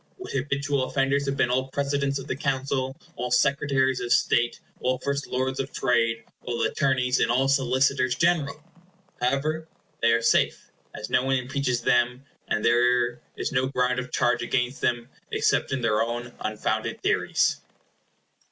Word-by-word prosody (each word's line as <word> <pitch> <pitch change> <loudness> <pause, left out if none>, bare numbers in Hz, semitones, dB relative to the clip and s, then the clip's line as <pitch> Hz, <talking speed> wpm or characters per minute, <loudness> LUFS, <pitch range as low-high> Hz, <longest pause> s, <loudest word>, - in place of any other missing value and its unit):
What 375 - -8
habitual 140 0 -1
offenders 140 +1 0
have 135 0 -1
been 125 - +2
all 130 +1 +1
Presidents 140 0 -1
of - - -7
the - - -3
Council, 135 -1 -2 0.2
all 125 +1 -2
Secretaries 135 0 +2
of 120 -1 -4
State, 120 0 +2 0.2
all 130 0 0
First 140 +2 -3
Lords 130 +1 -2
of 135 +1 -3
Trade, 115 -2 +1 0.2
all 120 -1 -2
Attorneys 130 -2 +1
and - - +2
all 130 +3 +2
Solicitors 130 -1 +2
General! 155 -2 +1 0.6
However, 150 +5 0 0.3
they 115 - +4
are 115 0 +1
safe, - - +1 0.2
as 105 - -7
no 125 - +3
one 135 0 +1
impeaches 130 -1 -1
them; 125 +2 +2 0.2
and 110 - -1
there 120 0 +3 0.2
is - - -2
no 130 0 +1
ground 125 -1 0
of 125 0 -6
charge 120 0 +1
against 125 +1 -1
them 120 -1 0 0.2
except - - +1
in 130 -1 -1
their 110 -2 +2
own 120 +1 -3
unfounded 110 0 -2
theories. - - +2
130 Hz, 160 wpm, -25 LUFS, 120-140 Hz, 0.6 s, they